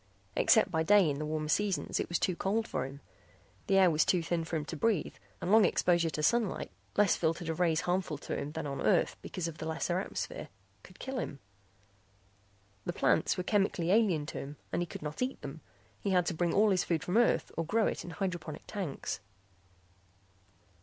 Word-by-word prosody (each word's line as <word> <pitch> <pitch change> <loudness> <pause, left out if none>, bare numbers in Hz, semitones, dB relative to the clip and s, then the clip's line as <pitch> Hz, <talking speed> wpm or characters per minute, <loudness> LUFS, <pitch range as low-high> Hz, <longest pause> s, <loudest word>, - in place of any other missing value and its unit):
Except 220 -3 +4
by 160 -2 +1
day 195 +2 +5
in 145 -1 -1
the 150 - -3
warmer 155 0 -2
seasons 195 +4 0
it - - -2
was 175 - +1
too 185 - 0
cold 215 +6 0
for 130 0 -2
him. 140 +1 -11 0.7
The 195 - +4
air 185 -2 +6
was 155 0 +3
too 180 -3 +2
thin 165 0 -1
for 165 +1 -4
him 155 -2 -1
to 160 - -5
breathe 190 0 +1 0.3
and 180 - -2
long 220 0 +7
exposure 170 -4 +3
to 150 -1 -3
sunlight 230 +1 +1 0.3
less 205 -3 +5
filtered 165 0 -1
of 160 - -3
rays 165 -2 +3
harmful 180 -4 -1
to - - -5
him 150 - -4
than - - -4
on 140 -1 -4
Earth - - +3
because 180 -3 -4
of 165 -2 -7
the 160 - -4
lesser 165 +2 -1
atmosphere - - -5 0.3
could - - -16
kill 265 -1 -4
him. 140 - -4 1.5
The - - -3
plants - - +2
were 180 - -1
chemically 190 -3 +1
alien 195 -8 +3
to - - -5
him 140 +1 -7 0.2
and - - +1
he 175 - -2
could 155 - -8
not 150 +6 -5
eat 255 +1 -1
them; 150 +2 -7 0.4
he 200 - -2
had 180 -2 +3
to 175 - -1
bring 170 +1 0
all 210 +3 +4
his 185 -2 +2
food 165 -2 -1
from 180 +2 -2
Earth 240 - +3
or 165 - -1
grow 215 +7 +1
it - - -2
in - - -8
hydroponic 170 -4 -4
tanks. 190 -10 -4
175 Hz, 210 wpm, -31 LUFS, 155-195 Hz, 1.5 s, long